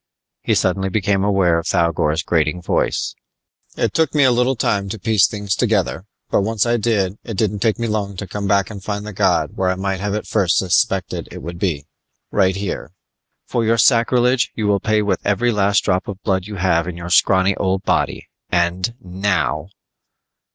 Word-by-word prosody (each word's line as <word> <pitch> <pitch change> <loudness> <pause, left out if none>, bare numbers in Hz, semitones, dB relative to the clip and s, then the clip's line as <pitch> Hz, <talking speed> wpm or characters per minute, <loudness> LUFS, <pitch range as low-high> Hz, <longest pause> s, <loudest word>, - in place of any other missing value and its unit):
He - - +1
suddenly 95 +1 +1
became 100 -1 0
aware 95 -5 +2
of 85 - -6
Thougor's 85 -3 +1
grating 80 +1 0
voice: 90 - -1 0.6
"It - - 0
took 160 -2 +1
me 145 - +5
a 130 - +5
little 125 +2 +2
time 100 -4 0
to 110 - -4
piece 110 -1 +3
things 100 -3 -3
together, 95 - 0 0.3
but - - +3
once 110 +1 0
I 120 0 +2
did, 105 -3 0
it 110 -4 -6
didn't 105 -1 0
take 110 0 +1
me 115 - -2
long 105 -3 -2
to 105 - -4
come 100 +2 -4
back 100 0 +1
and 100 -3 -9
find 100 0 -4
the 105 - -7
god - - +1
where 95 -1 +1
I 95 - 0
might 95 0 -2
have 100 +1 -2
at 105 - -3
first 95 -6 +1
suspected 90 -3 0
it - - -9
would 85 +2 -7
be 80 -7 -1 0.5
right 95 -2 +2
here! 95 -5 -5 0.5
For 120 - -1
your 115 +1 +2
sacrilege 125 0 +3
you 110 - -2
will 100 -1 +2
pay 110 +1 +1
with 100 - 0
every 120 +4 +1
last 100 -1 +2
drop 95 -1 0
of 100 -2 -6
blood 95 -2 0
you 105 - -7
have 85 -3 +1
in 90 -1 -5
your 85 0 -7
scrawny 95 +1 +4
old 95 0 -1
body - - -1 0.2
and 90 +5 0
now!" 90 -4 -1
100 Hz, 195 wpm, -19 LUFS, 90-110 Hz, 0.6 s, me